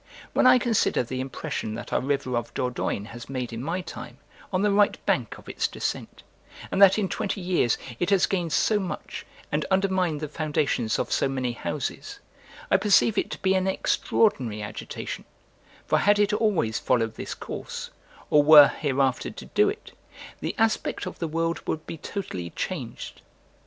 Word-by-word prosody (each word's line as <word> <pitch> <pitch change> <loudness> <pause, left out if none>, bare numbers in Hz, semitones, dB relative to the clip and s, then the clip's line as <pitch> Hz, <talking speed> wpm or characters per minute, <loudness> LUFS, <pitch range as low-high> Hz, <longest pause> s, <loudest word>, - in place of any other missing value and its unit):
When - - +4
I 255 0 +8
consider 235 - +1
the 130 +2 -5
impression 130 -4 -4
that 120 - -7
our - - +2
river 135 -2 -1
of 120 -1 -2
Dordogne 125 -5 -2
has 120 +1 -10
made 125 -3 -4
in 115 - -5
my 170 +5 -2
time 125 -7 -9 0.3
on 185 +1 +1
the 210 - +3
right 205 0 +3
bank - - 0
of - - -16
its - - -1
descent, - - -5 0.5
and 195 - 0
that 195 0 +8
in 205 -3 +1
twenty 195 +2 -3
years 175 -10 +1 0.2
it 175 - 0
has 195 -3 +4
gained 175 -4 -1
so 210 +9 +2
much, 185 -3 -6 0.2
and - - 0
undermined 190 -5 +1
the 155 - -4
foundations 145 -6 0
of - - -2
so 135 - +2
many 130 -2 -1
houses, 120 - -4 0.5
I - - +6
perceive 210 +1 +4
it - - 0
to - - -7
be 190 0 +3
an 190 0 +1
extraordinary 130 - +1
agitation: 105 - -6 0.6
for - - +2
had 205 0 +4
it 205 0 +2
always 195 - +1
followed 115 -3 +1
this - - -6
course, - - -7 0.4
or 150 - +7
were 145 -1 +9
hereafter 135 -3 0
to - - -10
do 420 0 +3
it, 430 +1 -7 0.5
the - - -3
aspect 225 -2 0
of - - -7
the 165 - -1
world 165 +1 -1
would 160 0 -2
be 165 - -6
totally 95 - -5
changed. 135 - -5
160 Hz, 175 wpm, -26 LUFS, 125-195 Hz, 0.6 s, were